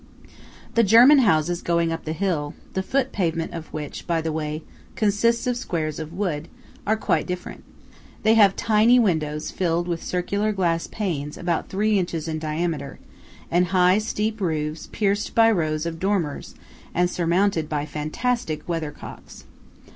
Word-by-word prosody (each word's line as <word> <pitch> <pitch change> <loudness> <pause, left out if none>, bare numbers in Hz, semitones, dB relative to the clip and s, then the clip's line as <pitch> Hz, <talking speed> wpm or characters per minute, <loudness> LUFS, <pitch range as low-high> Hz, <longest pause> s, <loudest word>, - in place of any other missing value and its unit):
The 230 - +4
German 240 +8 +7
houses 175 - +2
going 170 -1 +1
up 165 - -5
the 155 - -2
hill–the 175 0 -3
foot 265 +6 0
pavement 165 -4 -1
of 165 -1 -7
which, 150 -2 -6
by 170 -2 +1
the 160 0 -2
way, 155 0 -3 0.3
consists 230 +3 +2
of 245 -1 0
squares 160 - -3
of 160 0 -6
wood–are 175 +3 -3
quite - - 0
different. 180 0 -6 0.6
They 220 +1 +5
have 205 -4 +6
tiny 225 +3 +4
windows 155 -9 0
filled 175 -1 0
with 170 -2 -2
circular 200 +4 -1
glass 170 -4 0
panes 155 -9 -3
about 170 -2 -2
three 210 +1 +2
inches 170 -3 -3
in 155 -1 -2
diameter, 155 -2 -3 0.5
and 180 +1 +3
high 185 +2 +4
steep 215 0 -2
roofs 155 -3 -2
pierced 205 -1 -1
by 225 0 +6
rows 155 -5 0
of 165 -1 -4
dormers 185 -6 -2 0.4
and 180 0 +3
surmounted 175 -1 +1
by 150 -1 -1
fantastic 155 - -2
weather 165 -3 -2
cocks. - - -11
175 Hz, 150 wpm, -23 LUFS, 160-205 Hz, 0.6 s, German